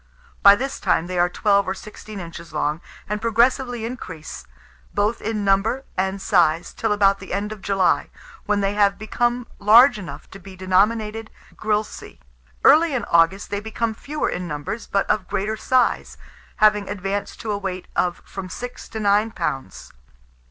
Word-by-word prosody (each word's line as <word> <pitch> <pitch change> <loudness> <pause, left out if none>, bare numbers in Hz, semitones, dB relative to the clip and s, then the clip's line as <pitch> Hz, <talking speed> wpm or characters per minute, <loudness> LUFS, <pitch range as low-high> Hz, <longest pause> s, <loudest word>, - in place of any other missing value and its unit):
By 200 0 +9
this 270 +5 -4
time 165 - +1
they 180 0 -3
are 175 0 +3
twelve 200 +1 +2
or 190 - -1
sixteen 215 +1 -10
inches 170 -1 -9
long, 150 +1 -1 0.3
and 210 +1 -3
progressively 240 +1 +1
increase, 185 -10 -8 0.5
both 210 +3 0
in 215 -1 -2
number 205 +7 +2
and 190 +1 -1
size, 170 -4 +2
till - - -1
about 200 -1 +3
the 190 - -10
end 205 +2 -2
of 215 -2 -8
July, 195 -2 +1 0.4
when 205 -1 +1
they 195 0 0
have 200 -1 +3
become 240 +3 -1
large 220 +4 +6
enough 180 - -9
to 195 - -10
be 190 0 -12
denominated 210 +4 +1 0.3
grilse. 215 0 -2 0.6
Early 310 0 +6
in 240 - -2
August 170 +4 +3
they 205 - -1
become 220 +1 -2
fewer 295 +7 -3
in 180 0 -3
numbers, 150 +8 -5
but 195 - 0
of 190 -3 0
greater 210 +3 -2
size, 250 +3 +1 0.4
haying 210 -2 +4
advanced 200 0 -4
to 220 - -3
a 205 - -1
weight 185 -2 -5
of 175 -1 0
from 190 -2 -7
six 245 +5 -8
to 220 - -5
nine 205 +1 +3
pounds. 135 - -5
205 Hz, 165 wpm, -22 LUFS, 190-220 Hz, 0.6 s, By